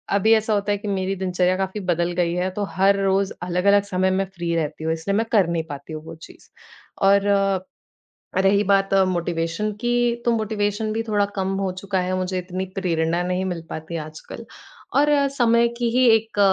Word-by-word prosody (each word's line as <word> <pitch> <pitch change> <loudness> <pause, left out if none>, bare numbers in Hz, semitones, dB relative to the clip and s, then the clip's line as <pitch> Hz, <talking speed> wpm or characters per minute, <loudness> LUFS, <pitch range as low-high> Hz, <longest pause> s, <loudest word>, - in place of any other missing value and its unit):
अभी 220 +3 +4
ऐसा 220 0 +2
होता 205 0 0
है, 205 - +1
कि 205 +1 -8
मेरी 195 -1 -1
दिनचर्या 180 -1 0
काफ़ी 190 +2 -3
बदल 175 0 0
गई 170 -1 +1
है, 180 +1 -1
तो 205 +2 -3
हर 195 +1 +3
रोज 195 0 +1
अलग-अलग 190 +3 +3
समय 190 -2 0
मैं 195 +1 +1
फ्री 170 -1 -2
रहती 155 -1 -3
हूँ। 160 0 0
इसलिए 165 +5 -2
मैं 225 - +1
कर 200 -6 +4
नहीं 170 -1 -1
पाती 145 +2 -8
हूँ, 155 - -7
वो 165 - -8
चीज़। 160 - -15 0.6
और 200 +1 +4 1.2
रही 200 +1 +4
बात 195 0 +2 0.2
मोटिवेशन 170 +3 -2
की, 240 0 +1
तो 235 - +3
मोटिवेशन 215 0 -1
भी 225 +1 -1
थोड़ा 210 -2 +1
कम 190 0 -1
हो 195 -1 -1
चुका 195 -1 -1
है, 180 +1 -1
मुझे 185 0 -2
इतनी 185 +1 -4
प्रेरणा 170 -2 0
नहीं 180 +1 -1
मिल 175 -3 -3
पाती 160 +2 -6
आजकल। 155 0 -8 0.5
और 290 +1 +4
अ, 285 -1 +3
समय 235 -3 +3
की 240 -1 0
ही 255 +2 +3
एक 220 -1 -6
190 Hz, 195 wpm, -22 LUFS, 175-210 Hz, 1.2 s, अभी